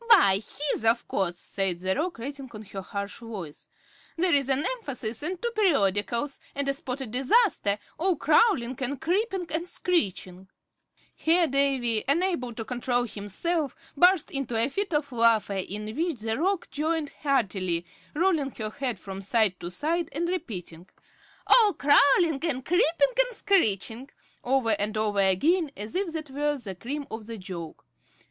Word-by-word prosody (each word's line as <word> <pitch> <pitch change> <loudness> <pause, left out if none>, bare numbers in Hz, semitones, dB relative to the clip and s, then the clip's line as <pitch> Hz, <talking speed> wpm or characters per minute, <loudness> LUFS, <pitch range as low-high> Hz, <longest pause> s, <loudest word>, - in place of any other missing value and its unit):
"Why, 200 - +6 0.3
his, - - -4
of 225 +1 +2
course," 175 -3 -1
said 190 -2 -2
the 185 +1 0
Roc, 335 - -2
rattling 275 +2 -7
on 210 - -7
in - - -18
her 195 - -5
harsh 200 +1 -5
voice. 205 -10 -8 0.5
"There's 290 -6 +2
an 270 +3 +2
Emphasis 260 - -3
and 350 +4 -3
two 475 +3 -2
Periodicals, 275 - +1 0.2
and 280 0 -1
a 275 - +2
Spotted 265 -3 -5
Disaster, 265 - +3 0.2
all 365 +2 +2
crawlin' 290 - +3
and 265 +2 -2
creepin' 375 +3 0
and 330 +3 -1
screechin'" 190 - -1 0.7
Here 335 +2 +3
Davy, 270 -6 +1
unable 305 -4 +1
to 225 - -5
control 245 0 0
himself, 250 - -2 0.2
burst 355 +2 +4
into 275 -4 -3
a 230 +4 +3
fit 395 +7 -2
of 295 -2 -1
laughter, 230 -4 +3
in 210 +3 -4
which 320 -6 -1
the 225 0 -1
Roc 365 +7 -1
joined 310 0 -1
heartily, 190 - 0 0.3
rolling 320 -4 +2
her 215 -1 -4
head 250 -5 -3
from 195 0 -7
side 200 -2 +1
to 175 - -5
side, 320 - -1
and 335 +4 -1
repeating, 180 - -5 0.6
"All 435 -5 +6
crawlin' 285 +2 +4
and 265 -6 -2
creepin' 355 +9 +2
and - - +2
screechin'," 245 - +1 0.3
over 250 -2 +2
and 210 +2 -2
over 210 -2 0
again, 290 - +3
as 210 +2 -6
if 370 -2 0
that 310 -3 -5
were 290 +1 0
the 215 -7 -7
cream 275 +10 -5
of 220 -1 -7
the 230 -1 -6
joke. 180 -4 -8
265 Hz, 160 wpm, -27 LUFS, 210-330 Hz, 0.7 s, Why